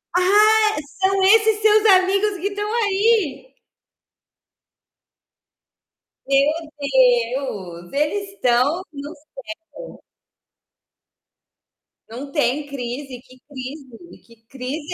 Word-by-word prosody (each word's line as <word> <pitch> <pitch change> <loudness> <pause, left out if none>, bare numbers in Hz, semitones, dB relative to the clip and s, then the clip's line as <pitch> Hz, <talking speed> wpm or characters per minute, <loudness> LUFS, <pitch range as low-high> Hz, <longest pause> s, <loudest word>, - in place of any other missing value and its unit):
Ah! 425 +3 +4 0.3
São 385 0 +2
esses 430 +1 +4
seus 430 0 +4
amigos 390 +1 +3
que 390 - -2
estão 415 +1 -4 0.2
aí? 415 - 0 2.7
Meu 275 0 +3 0.4
Deus! 245 -9 0
Eles 350 +8 -1
estão 265 +3 +1
no 285 +2 -8
céu. 305 +10 -28 2.7
Não 265 +5 -9
tem 290 -1 0
crise, 260 0 -6
que 255 0 -20
crise? 270 +2 -11
Que 230 - -19
crise 285 +7 -6
295 Hz, 85 wpm, -20 LUFS, 260-400 Hz, 2.7 s, Ah